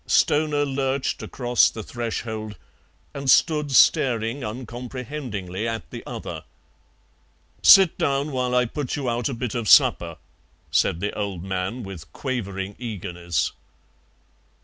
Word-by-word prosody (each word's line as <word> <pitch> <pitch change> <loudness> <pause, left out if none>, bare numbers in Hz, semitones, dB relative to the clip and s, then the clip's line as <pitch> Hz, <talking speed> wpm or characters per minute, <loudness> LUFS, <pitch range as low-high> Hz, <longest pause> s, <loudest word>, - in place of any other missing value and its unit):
Stoner 145 -1 +2
lurched 135 -1 -1
across 120 -2 +2
the 110 - -7
threshold 110 -2 -5 0.6
and 140 -1 -3
stood 150 +1 +3
staring 120 -1 +3
uncomprehendingly 120 -3 -5
at 115 -1 -4
the - - -7
other. - - -6 1.2
"Sit 190 -4 +7
down 140 +2 0
while 125 -1 -1
I 125 0 +4
put 135 +2 -4
you 140 -3 -3
out 120 +2 -1
a 135 - -4
bit 120 -2 -4
of 115 -4 -2
supper," 85 -2 +5 0.5
said 85 - +1
the 105 - -2
old 100 -5 -4
man 95 +6 -3
with 90 -4 -9
quavering 100 -7 -4
eagerness. 90 -7 -3
120 Hz, 125 wpm, -24 LUFS, 105-135 Hz, 1.2 s, Sit